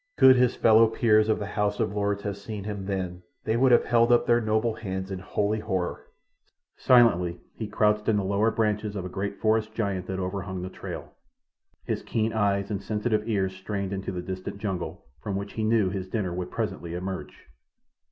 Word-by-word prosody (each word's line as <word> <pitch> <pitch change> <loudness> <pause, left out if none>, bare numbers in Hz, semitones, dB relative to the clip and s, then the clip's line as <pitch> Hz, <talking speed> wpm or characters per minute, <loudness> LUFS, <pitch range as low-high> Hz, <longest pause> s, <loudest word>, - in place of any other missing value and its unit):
Could 130 -1 +8
his 125 -1 +3
fellow 115 0 +6
peers 110 -1 +3
of 110 - +3
the 105 - -4
House 105 0 -1
of 95 - 0
Lords 100 0 -1
have 100 -1 -2
seen 100 0 -7
him 100 -2 -5
then 90 -2 -3 0.2
they 110 - 0
would 130 +2 +4
have 120 - +5
held 120 0 +3
up 120 - +4
their 120 0 +3
noble 110 +1 +1
hands 95 -3 -5
in 95 - -3
holy 105 +3 -1
horror. 95 -4 -3 0.7
Silently 90 -9 +4
he 110 - -5
crouched 105 0 +1
in 110 - +3
the 100 - 0
lower 100 +3 +2
branches 105 -2 -1
of 95 -2 -4
a - - -4
great 100 +2 -4
forest 110 0 +1
giant 100 -5 -2
that 95 - -3
overhung 95 0 -4
the 90 - -4
trail, - - -8 0.7
his - - -2
keen 110 0 -1
eyes 100 -2 +1
and 100 -1 -2
sensitive 105 +1 -1
ears 95 -3 0
strained 100 0 -4
into 95 0 -3
the 90 -1 -4
distant 95 +1 -5
jungle, 95 -4 -4 0.2
from 100 -2 -3
which 100 +1 -4
he 110 - -2
knew 110 -4 +2
his 95 -1 -4
dinner 95 -4 -2
would 90 0 -4
presently 95 -7 -4
emerge. 95 +1 -6
100 Hz, 200 wpm, -26 LUFS, 95-110 Hz, 0.7 s, Could